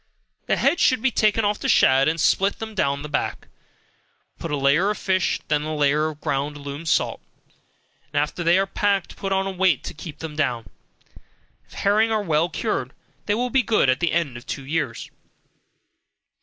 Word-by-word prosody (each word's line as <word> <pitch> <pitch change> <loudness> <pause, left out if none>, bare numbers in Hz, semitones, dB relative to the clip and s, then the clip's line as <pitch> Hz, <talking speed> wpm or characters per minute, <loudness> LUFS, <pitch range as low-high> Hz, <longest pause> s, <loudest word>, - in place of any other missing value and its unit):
The - - +2
heads 350 - +2
should 255 -3 +3
be 265 - +3
taken 215 -1 +2
off 205 0 0
the - - -2
shad, 135 +1 +5
and 160 +2 0
split 195 +5 +2
them 220 0 -7
down 140 -7 0
the - - -5
back, 145 - -3 0.9
put 165 - -5
a 145 - -1
layer 140 +8 +3
of 210 - -1
fish, 185 -2 0
then 150 -1 +1
a 155 +1 -3
layer 150 +1 +2
of 155 -1 -7
ground 140 +2 -2
alum 145 +3 -7
salt, - - +1 0.9
and 145 - +1
after 150 +4 -2
they 170 +2 +4
are 195 - +2
packed, 195 -1 -1
put 195 - -4
on 195 0 +1
a 195 - -2
weight 185 -6 +1
to - - -6
keep 155 -1 -9
them 155 -1 -7
down. 120 -8 -1 1.0
If - - -19
herring 215 +3 +2
are 215 -1 +1
well 165 -1 +1
cured, 135 - -3 0.3
they 205 - +2
will 245 +2 -1
be 265 - +4
good 215 - +2
at 130 - -1
the 170 -2 +1
end 160 -8 -1
of 120 - -13
two 135 - -5
years. 145 -5 -3
165 Hz, 195 wpm, -23 LUFS, 145-200 Hz, 1.0 s, shad